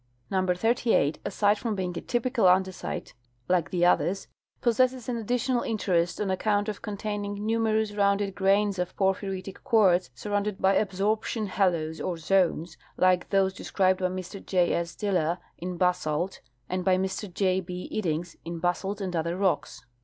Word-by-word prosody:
Number 185 -2 +1
38, 225 -7 +2
aside 205 0 +2
from 225 -3 -2
being 180 -2 -3
a - - -4
typical 240 -3 0
andesite 185 0 0 0.3
like 175 -5 +2
the 175 +1 +2
others, 180 +2 +2 0.3
possesses 250 0 +2
an 250 - -1
additional 245 +2 0
interest 175 -6 0
on 200 -2 0
account 205 +2 +1
of 210 -1 -4
containing 205 0 -4
numer 220 +1 +1
ous 220 -1 -1
rounded 200 -1 +1
grains 200 0 +2
of 180 - -2
i^orphyritic 190 0 -1
quartz 200 - +4
surrounded 205 - -2
by 195 +1 +3
absorp 205 +2 +1
tion 220 -2 -2
halos 170 -5 0
or 175 - -2
zones, 170 -1 +1 0.2
like 185 -1 +3
those 195 -1 +2
described 185 -1 +1
by 185 - +1
Mr 185 +1 -6
J. 180 -2 +2
S. 170 0 -2
Diller 180 -5 0 0.2
in 180 +1 -4
basalt 180 -1 +1
t - - -14 0.3
and 185 0 -2
by 185 -1 +3
Mr 190 +1 -3
J. 185 0 +1
P. 180 0 -6
Iddings 170 -4 -2
in 170 0 -5
basalt 190 +4 -1
and 185 -2 -3
other 170 +2 -1
rocks.' 190 -2 -1
190 Hz, 165 wpm, -27 LUFS, 180-210 Hz, 0.3 s, quartz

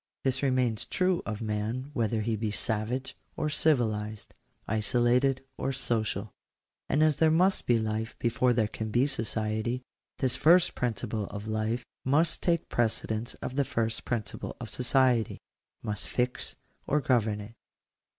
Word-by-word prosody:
This 130 -1 0
remains 130 -5 +1
true 185 -1 +1
of 110 0 -3
maa 105 +1 -1 0.2
whether 115 -2 0
he 110 +1 0
be 110 0 -2
savage 110 +5 -2 0.2
or 150 - 0
civilized 110 -9 +1 0.2
— - - -44
isolated 125 +5 +2
or 135 - 0
social. 115 -4 -1 0.6
And 150 - +3
as 155 -2 +3
there 160 +1 +5
must 180 +5 +3
be 120 - +5
life 110 +1 -2
before 120 +1 +2
there 115 -3 +2
can 110 +1 -5
be 120 +4 +3
sooiety, 110 -1 -2 0.3
this 130 -2 +1
first 170 +6 +5
principle 115 -3 -2
of 105 +1 -7
life 110 +3 -1 0.2
must 155 +5 +2
take 170 -2 +1
prece 115 -2 0
dence 110 +2 -3
of 130 - -5
the 140 - +4
first 115 -3 -1
principle 115 -4 -3
of - - -6
society 125 -2 +2 0.2
— - - -47
must 105 -2 -3
fix 125 0 -1 0.3
or 150 - +3
govern 115 -6 +1
it. 105 +2 -9
120 Hz, 155 wpm, -29 LUFS, 110-130 Hz, 0.6 s, there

